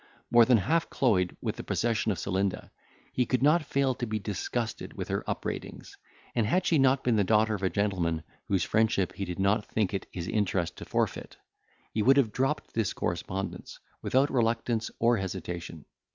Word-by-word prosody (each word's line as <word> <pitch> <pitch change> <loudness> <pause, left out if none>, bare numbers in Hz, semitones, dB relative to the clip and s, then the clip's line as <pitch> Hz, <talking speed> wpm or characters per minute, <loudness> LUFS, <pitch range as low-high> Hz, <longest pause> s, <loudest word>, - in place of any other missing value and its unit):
More 120 -1 +7
than 125 -1 +5
half 155 - +1
cloyed 95 -9 +1
with - - -3
the - - -5
possession 115 -2 0
of 95 - -2
Celinda, 95 0 -2 0.4
he 125 - +1
could 130 0 +1
not 155 +4 +5
fail 140 -2 +1
to 120 0 -4
be 110 0 -1
disgusted 110 +3 -3
with - - -6
her - - -1
upbraidings; - - -5 0.4
and 115 -3 +1
had 180 - +2
she 160 - +3
not 135 0 +3
been 120 -3 +2
the 100 - +4
daughter 110 +2 +3
of 100 - -3
a 95 - +1
gentleman 90 -6 0 0.2
whose 95 -3 +1
friendship 110 -4 +1
he 100 - -4
did 90 -1 -5
not 100 +2 +2
think 105 -4 0
it 95 - -3
his 85 -1 -5
interest 95 -5 0
to - - -8
forfeit, - - -2 0.6
he 110 - +1
would 135 +5 +5
have 120 -6 +3
dropped 135 +4 -1
this 115 -4 0
correspondence, 95 +3 -4 0.2
without 135 +3 +2
reluctance 115 -2 0
or 120 0 +3
hesitation. 85 -4 -5
110 Hz, 185 wpm, -29 LUFS, 95-125 Hz, 0.6 s, More